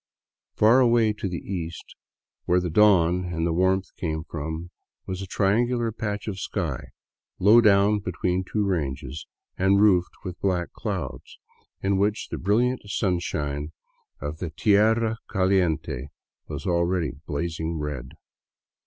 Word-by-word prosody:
Far 115 Hz, +4 st, +5 dB
away 115 Hz, -3 st, +4 dB
to 105 Hz, -2 st, -4 dB
the 90 Hz, -, -3 dB
east, 85 Hz, -4 st, -5 dB, 0.5 s
where 90 Hz, +1 st, +3 dB
the 90 Hz, -2 st, -3 dB
dawn 90 Hz, -2 st, +4 dB
and 85 Hz, -2 st, -2 dB
the 85 Hz, -, +1 dB
warmth 95 Hz, +2 st, +1 dB
come 80 Hz, -2 st, -2 dB
from, 80 Hz, +2 st, -5 dB, 0.3 s
was 95 Hz, 0 st, -4 dB
a 95 Hz, -, -6 dB
triangular 115 Hz, +5 st, +1 dB
patch 105 Hz, -1 st, -4 dB
of 100 Hz, -3 st, -4 dB
sky, 85 Hz, -8 st, -3 dB, 0.5 s
low 110 Hz, +5 st, +6 dB
down 105 Hz, -1 st, +4 dB
between 90 Hz, -1 st, -1 dB
two 105 Hz, +2 st, -1 dB
ranges 70 Hz, -5 st, -3 dB, 0.3 s
and 95 Hz, +1 st, +4 dB
roofed 95 Hz, -4 st, +3 dB
with 90 Hz, -1 st, -6 dB
black 90 Hz, -3 st, 0 dB
clouds, -, -, -5 dB, 0.5 s
in 95 Hz, 0 st, +2 dB
which 105 Hz, +1 st, 0 dB
the -, -, -4 dB
brilliant 120 Hz, +7 st, +1 dB
sun 95 Hz, -3 st, 0 dB
shine 75 Hz, -2 st, -3 dB, 0.5 s
of 75 Hz, +3 st, -5 dB
the 90 Hz, -, -3 dB
tierra 110 Hz, +6 st, +2 dB
caliente 85 Hz, -, 0 dB, 0.4 s
was -, -, -6 dB
already 85 Hz, -2 st, +1 dB, 0.2 s
blazing 80 Hz, +2 st, -3 dB
red. 75 Hz, -4 st, -5 dB
90 Hz, 135 wpm, -25 LUFS, 80-105 Hz, 0.5 s, low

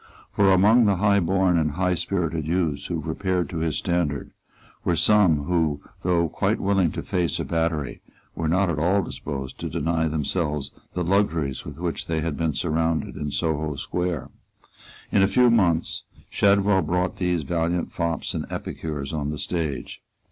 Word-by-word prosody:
For 100 Hz, -1 st, +4 dB
among 105 Hz, +6 st, +6 dB
the 100 Hz, -2 st, +3 dB
high 100 Hz, +2 st, +3 dB
born 95 Hz, -1 st, +2 dB
and 75 Hz, -2 st, 0 dB
high 90 Hz, +3 st, +1 dB
spirited 85 Hz, -4 st, -1 dB
youths 80 Hz, -4 st, 0 dB
who -, -, -2 dB
repaired 95 Hz, -3 st, -1 dB
to 85 Hz, -, -4 dB
his 80 Hz, -2 st, 0 dB
standard 85 Hz, -5 st, -1 dB, 0.5 s
were -, -, +1 dB
some 95 Hz, -9 st, +4 dB
who, 80 Hz, -3 st, +1 dB, 0.2 s
though 85 Hz, -2 st, +2 dB
quite -, -, 0 dB
willing 95 Hz, -4 st, +2 dB
to -, -, -4 dB
face 90 Hz, -4 st, -1 dB
a -, -, -2 dB
battery, 80 Hz, -3 st, -1 dB, 0.3 s
were 80 Hz, -, -2 dB
not 95 Hz, +4 st, +2 dB
at 75 Hz, -, -2 dB
all 95 Hz, +5 st, +2 dB
disposed 70 Hz, -5 st, -6 dB
to -, -, -4 dB
deny 80 Hz, +1 st, 0 dB
themselves 75 Hz, -2 st, -1 dB, 0.2 s
the 90 Hz, -, 0 dB
luxuries 85 Hz, -7 st, 0 dB
with 75 Hz, -1 st, -8 dB
which 85 Hz, -1 st, -3 dB
they 80 Hz, -1 st, -1 dB
had 80 Hz, -1 st, -2 dB
been 80 Hz, -1 st, 0 dB
surrounded 80 Hz, 0 st, 0 dB
in 75 Hz, -, -3 dB
Soho 80 Hz, -1 st, -1 dB
Square. 90 Hz, -1 st, -3 dB, 0.8 s
In 100 Hz, -, +4 dB
a 95 Hz, -, +5 dB
few 120 Hz, +4 st, +4 dB
months 85 Hz, -8 st, +2 dB, 0.3 s
Shadwell 100 Hz, -1 st, +4 dB
brought 90 Hz, +3 st, -1 dB
these 90 Hz, -3 st, 0 dB
valiant 85 Hz, +4 st, -1 dB
fops 85 Hz, -1 st, -2 dB
and -, -, -3 dB
epicures 75 Hz, -2 st, -5 dB
on 75 Hz, -2 st, -2 dB
the 75 Hz, -, -3 dB
stage. 75 Hz, -3 st, -3 dB
85 Hz, 170 wpm, -24 LUFS, 75-95 Hz, 0.8 s, among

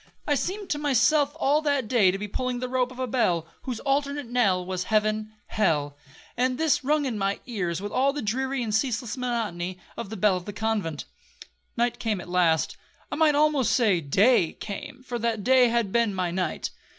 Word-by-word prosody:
I 295 Hz, -, +2 dB
seemed 385 Hz, +7 st, -3 dB
to 295 Hz, -, 0 dB
myself 290 Hz, +1 st, +3 dB
all 295 Hz, +1 st, +3 dB
that 285 Hz, -6 st, 0 dB
day 215 Hz, -5 st, +4 dB
to 185 Hz, -, -1 dB
be 210 Hz, +1 st, -5 dB
pulling 255 Hz, +4 st, -2 dB
the 255 Hz, +1 st, -3 dB
rope 255 Hz, 0 st, 0 dB
of 255 Hz, -, -12 dB
a 260 Hz, -, -1 dB
bell, 180 Hz, -10 st, +1 dB, 0.2 s
whose 250 Hz, -4 st, -3 dB
alternate 280 Hz, 0 st, 0 dB
knell 215 Hz, -7 st, +1 dB
was 185 Hz, 0 st, -3 dB
heaven—hell, 215 Hz, -8 st, 0 dB, 0.4 s
and 255 Hz, +1 st, +1 dB
this 320 Hz, -2 st, +2 dB
rung 295 Hz, +2 st, +1 dB
in 235 Hz, -5 st, -2 dB
my 195 Hz, 0 st, 0 dB
ears 185 Hz, -7 st, -3 dB
with 205 Hz, -, -4 dB
all 275 Hz, +2 st, +2 dB
the 290 Hz, -2 st, -5 dB
dreary 260 Hz, +4 st, -1 dB
and 215 Hz, -2 st, -3 dB
ceaseless 235 Hz, 0 st, 0 dB
monotony 215 Hz, -8 st, -3 dB, 0.2 s
of 230 Hz, -4 st, -6 dB
the 220 Hz, -, -6 dB
bell 195 Hz, -1 st, +3 dB
of 180 Hz, -, -8 dB
the 205 Hz, -, -6 dB
convent. 210 Hz, -9 st, -2 dB, 0.7 s
Night 240 Hz, 0 st, 0 dB
came 220 Hz, -5 st, -1 dB
at 175 Hz, -, -9 dB
last. 175 Hz, -3 st, +2 dB, 0.3 s
I -, -, -1 dB
might 305 Hz, -1 st, +4 dB
almost 295 Hz, -4 st, +3 dB
say 205 Hz, -8 st, +3 dB
day 185 Hz, -, +3 dB
came, 255 Hz, +5 st, -8 dB
for 245 Hz, -2 st, -4 dB
that 225 Hz, -2 st, -1 dB
day 255 Hz, +1 st, +5 dB
had 230 Hz, -4 st, 0 dB
been 230 Hz, -3 st, +1 dB
my 180 Hz, -2 st, -1 dB
night. 185 Hz, +1 st, -2 dB
230 Hz, 200 wpm, -26 LUFS, 195-260 Hz, 0.7 s, day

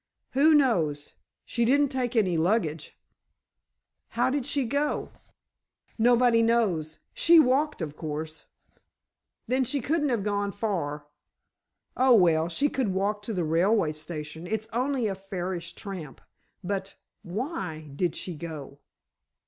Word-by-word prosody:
"Who 300 Hz, +4 st, +5 dB
knows? 165 Hz, -, +1 dB, 0.3 s
She 235 Hz, -, -1 dB
didn't 280 Hz, +4 st, +3 dB
take 255 Hz, -2 st, -2 dB
any 190 Hz, -6 st, +2 dB
luggage——" 165 Hz, -3 st, 0 dB, 1.1 s
"How 245 Hz, +2 st, 0 dB
did 280 Hz, -2 st, -2 dB
she 280 Hz, -2 st, 0 dB
go?" 285 Hz, +5 st, -1 dB, 0.9 s
"Nobody 240 Hz, 0 st, +4 dB
knows. 205 Hz, -10 st, +1 dB, 0.2 s
She 335 Hz, 0 st, +6 dB
walked, 270 Hz, -, +2 dB
of 150 Hz, -2 st, -6 dB
course——" 155 Hz, 0 st, -6 dB, 1.0 s
"Then 260 Hz, +1 st, +1 dB
she 280 Hz, +3 st, -1 dB
couldn't 295 Hz, +3 st, 0 dB
have 235 Hz, -5 st, 0 dB
gone 200 Hz, -1 st, -1 dB
far." 165 Hz, -9 st, -3 dB, 0.9 s
"Oh, 255 Hz, -1 st, +5 dB
well, 165 Hz, -4 st, +4 dB
she 280 Hz, +12 st, +1 dB
could 265 Hz, -4 st, -1 dB
walk 205 Hz, +2 st, 0 dB
to 210 Hz, -, -5 dB
the 180 Hz, -, 0 dB
railway 165 Hz, +2 st, +2 dB
station. 155 Hz, +1 st, -7 dB
It's 220 Hz, +1 st, -2 dB
only 255 Hz, 0 st, 0 dB
a 205 Hz, -, 0 dB
fairish 185 Hz, -3 st, -5 dB
tramp. 180 Hz, -, -8 dB, 0.4 s
But 195 Hz, +1 st, -3 dB, 0.3 s
why 180 Hz, -, -5 dB
did 175 Hz, 0 st, 0 dB
she 180 Hz, -, -5 dB
go?" 150 Hz, -3 st, -8 dB
200 Hz, 130 wpm, -27 LUFS, 165-250 Hz, 1.1 s, She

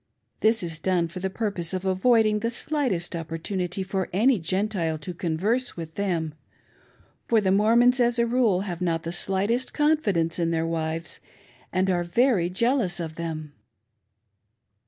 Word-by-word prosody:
This 220 Hz, -1 st, +2 dB
is 165 Hz, -2 st, -5 dB
done 175 Hz, -1 st, +1 dB
for 180 Hz, +2 st, -7 dB
the 190 Hz, +1 st, -2 dB
purpose 190 Hz, -4 st, -3 dB
of 185 Hz, +1 st, -4 dB
avoiding 215 Hz, +3 st, +3 dB
the 230 Hz, +2 st, -1 dB
slightest 240 Hz, -, -1 dB
opportunity 175 Hz, +3 st, -3 dB
for 190 Hz, 0 st, -2 dB
any 225 Hz, +5 st, +3 dB
Gentile 185 Hz, -2 st, -1 dB
to 180 Hz, +4 st, -7 dB
converse 190 Hz, +10 st, -1 dB
with 165 Hz, -1 st, -7 dB
them; 170 Hz, -6 st, -2 dB, 0.9 s
for 230 Hz, -, +4 dB
the 190 Hz, -3 st, +1 dB
Mormons, 235 Hz, +5 st, +4 dB
as 240 Hz, 0 st, +2 dB
■a. 235 Hz, 0 st, +2 dB
rule, 230 Hz, -6 st, +2 dB
have 180 Hz, -3 st, -5 dB
not 165 Hz, -2 st, 0 dB
the 165 Hz, -, -4 dB
slightest 195 Hz, +8 st, +1 dB
confidence 205 Hz, -, +1 dB
in 165 Hz, -1 st, +1 dB
their 165 Hz, -1 st, 0 dB
wives, 165 Hz, 0 st, -2 dB, 0.5 s
and 185 Hz, +1 st, +1 dB
are 175 Hz, -1 st, +1 dB
very 185 Hz, 0 st, +2 dB
jealous 215 Hz, -2 st, +1 dB
of 160 Hz, -2 st, -4 dB
them. 155 Hz, -2 st, -5 dB
185 Hz, 155 wpm, -25 LUFS, 170-225 Hz, 0.9 s, for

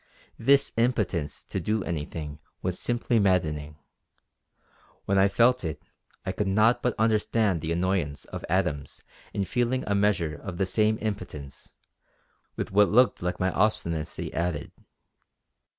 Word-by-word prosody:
This 140 Hz, +4 st, +4 dB
impotence 105 Hz, -, 0 dB
to -, -, -4 dB
do 105 Hz, +4 st, -1 dB
anything 75 Hz, -2 st, -5 dB, 0.2 s
was 90 Hz, -1 st, 0 dB
simply 120 Hz, -1 st, +1 dB
maddening; 75 Hz, -6 st, +1 dB, 1.3 s
when 100 Hz, 0 st, +2 dB
I 95 Hz, -, +6 dB
felt 120 Hz, +5 st, +3 dB
it 80 Hz, -3 st, -3 dB, 0.5 s
I -, -, -1 dB
could 100 Hz, +1 st, -2 dB
not 110 Hz, +5 st, +3 dB
but 125 Hz, -3 st, 0 dB
understand 110 Hz, -4 st, +2 dB
the 80 Hz, -, -3 dB
annoyance 85 Hz, -5 st, -1 dB
of -, -, -7 dB
Adams 80 Hz, -6 st, -1 dB, 0.3 s
in 100 Hz, -, -1 dB
feeling 125 Hz, +5 st, 0 dB
a 100 Hz, -, 0 dB
measure 100 Hz, -6 st, +1 dB
of 90 Hz, +1 st, -7 dB
the 95 Hz, -, +1 dB
same 110 Hz, +3 st, +2 dB
impotence, 90 Hz, -10 st, -6 dB, 0.8 s
with -, -, -4 dB
what 105 Hz, +1 st, +5 dB
looked 125 Hz, +4 st, +4 dB
like 90 Hz, 0 st, -2 dB
my 95 Hz, 0 st, +1 dB
obstinacy 85 Hz, -8 st, -1 dB
added. 85 Hz, -3 st, -2 dB
95 Hz, 135 wpm, -27 LUFS, 85-110 Hz, 1.3 s, I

